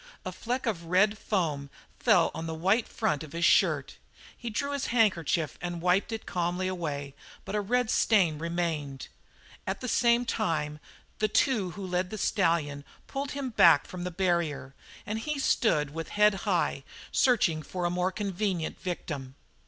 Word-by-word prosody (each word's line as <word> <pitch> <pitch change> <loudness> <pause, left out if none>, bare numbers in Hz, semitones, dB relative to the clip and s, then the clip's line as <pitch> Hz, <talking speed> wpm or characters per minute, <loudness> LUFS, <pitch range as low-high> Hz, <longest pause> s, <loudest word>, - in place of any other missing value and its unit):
A - - -3
fleck 250 +3 -3
of 185 -8 -2
red 190 +5 +3
foam 160 -10 -2 0.3
fell - - +4
on 165 - -5
the 160 - -3
white 195 +8 +2
front 205 -10 -1
of 155 - -11
his 170 +1 +1
shirt. - - +3 0.4
He 240 - -6
drew 280 +6 -2
his 280 -1 -2
handkerchief 175 - +1
and 175 0 -4
wiped 180 +5 +2
it 225 -1 -5
calmly 180 +1 -1
away, 145 -6 -4 0.3
but - - -6
a 210 - +1
red 245 +3 +1
stain 180 -9 +3
remained. 165 -5 -3 0.6
At - - -2
the 255 - -5
same 240 0 +3
time 155 -10 -1 0.4
the 215 - +3
two 215 -3 +2
who 200 - -5
led 180 0 -1
the 215 - -5
stallion 165 -8 +1 0.2
pulled 275 0 -4
him 270 -2 -3
back 170 -9 +6
from 180 -1 -7
the 180 - -2
barrier 165 -7 -1 0.3
and 215 +1 -3
he 300 +5 -3
stood 155 - +2
with 165 0 -5
head 210 0 +4 0.2
high, 170 -6 +1 0.3
searching 210 -11 +3
for 175 +4 -4
a 175 - +1
more 180 +1 0
convenient 195 -4 -2
victim. 145 -7 -5
180 Hz, 170 wpm, -28 LUFS, 160-215 Hz, 0.6 s, back